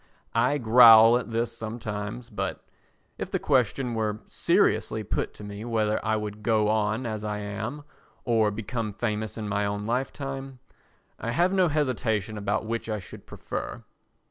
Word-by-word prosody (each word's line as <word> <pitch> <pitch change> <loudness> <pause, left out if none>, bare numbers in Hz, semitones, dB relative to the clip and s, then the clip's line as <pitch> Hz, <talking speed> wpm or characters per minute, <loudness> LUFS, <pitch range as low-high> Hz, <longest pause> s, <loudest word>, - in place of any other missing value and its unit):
I 125 +5 +2
growl 115 -2 +8
at 125 - -7
this 115 +1 -1
sometimes 110 +1 -5
but, 105 - -4 0.5
if - - -4
the - - 0
question 125 0 +1
were 110 -1 -2
seriously - - +1
put - - -2
to - - -11
me 105 +1 -7
whether 110 -2 0
I 110 0 +1
would 105 -1 -4
go 110 -1 +2
on 110 +3 0
as 110 -2 -4
I 105 -1 -2
am 110 +8 -5 0.4
or 115 -3 +3
become 110 +1 -4
famous 110 0 -3
in 110 -1 -4
my 105 0 0
own 100 0 -2
lifetime, 135 +2 -3 0.6
I 115 - -4
have 175 +10 +2
no 185 -2 +4
hesitation 115 - -1
about 105 +1 -1
which 115 +1 -3
I 110 - -1
should 95 - -11
prefer. - - -6
110 Hz, 160 wpm, -26 LUFS, 105-120 Hz, 0.6 s, growl